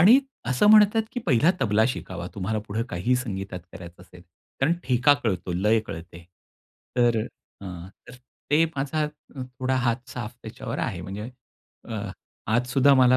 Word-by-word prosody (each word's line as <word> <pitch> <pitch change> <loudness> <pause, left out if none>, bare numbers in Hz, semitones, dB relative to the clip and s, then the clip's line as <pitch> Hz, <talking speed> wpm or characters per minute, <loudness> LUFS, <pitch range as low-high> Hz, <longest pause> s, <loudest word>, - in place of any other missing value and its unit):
आणि 220 +10 +8 0.3
असं 130 +11 +3
म्हणतात, 215 +1 +7
की 245 - -3
पहिला 145 +4 +5
तबला 110 0 +3
शिकावा. 90 -8 -5
तुम्हाला 105 +2 -1
पुढे 110 +3 -1
काही 90 +9 0
संगीतात 95 -6 -4
करायचं 85 -1 -11
असेल. 90 -1 -16 0.4
कारण 145 +5 +4
ठेका 125 +3 +5
कळतो, 90 -4 -1
लय 105 +5 +3
कळते. 85 +1 -8 0.7
तर 120 -2 +4 0.4
अ, - - -9
अ, 90 0 -7 0.2
तर 125 - -10 0.4
ते 155 +3 +5
माझा 150 +3 0 0.3
थोडा 130 0 -3
हात 120 +1 0
साफ 120 -2 -6
त्याच्यावर 110 - -6
आहे. - - -2
म्हणजे 105 +5 -6 0.6
अ, 110 -2 -3 0.5
आज 120 +3 +2
सुद्धा 140 0 +6
मला 130 -1 +6
120 Hz, 155 wpm, -25 LUFS, 95-130 Hz, 0.7 s, आणि